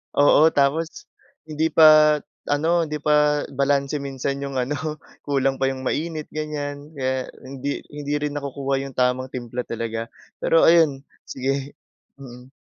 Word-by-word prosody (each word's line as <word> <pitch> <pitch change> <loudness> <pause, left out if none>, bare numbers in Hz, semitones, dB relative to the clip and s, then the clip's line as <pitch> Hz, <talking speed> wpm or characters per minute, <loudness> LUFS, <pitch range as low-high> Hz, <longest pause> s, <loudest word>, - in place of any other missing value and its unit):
Oo, 145 +2 +6
tapos 145 +4 +2 0.6
hindi 155 +1 -1
pa, 155 -2 +6 0.3
ano, 165 +3 +2
hindi 150 - -4
pa 150 -1 +3
balanse 140 +1 0
minsan 140 0 -3
'yong 140 -1 -5
ano, 145 +4 -2 0.3
kulang 135 -1 +1
pa 135 - +2
'yong 130 0 -3
mainit 155 +2 -3
ganyan. 150 -1 -5
Kaya, 130 -1 -2 0.2
hindi 135 +2 -5
hindi 145 0 -4
rin 150 0 -2
nakukuha 140 -1 -2
yung 135 - -12
tamang 125 +1 +1
timpla 125 0 -5
talaga. 115 0 -4 0.3
Pero 165 - +3
ayun, 155 -5 +4 0.2
sige. 135 +1 -3 0.4
Mm. 125 -2 -12
140 Hz, 140 wpm, -23 LUFS, 135-150 Hz, 0.6 s, Oo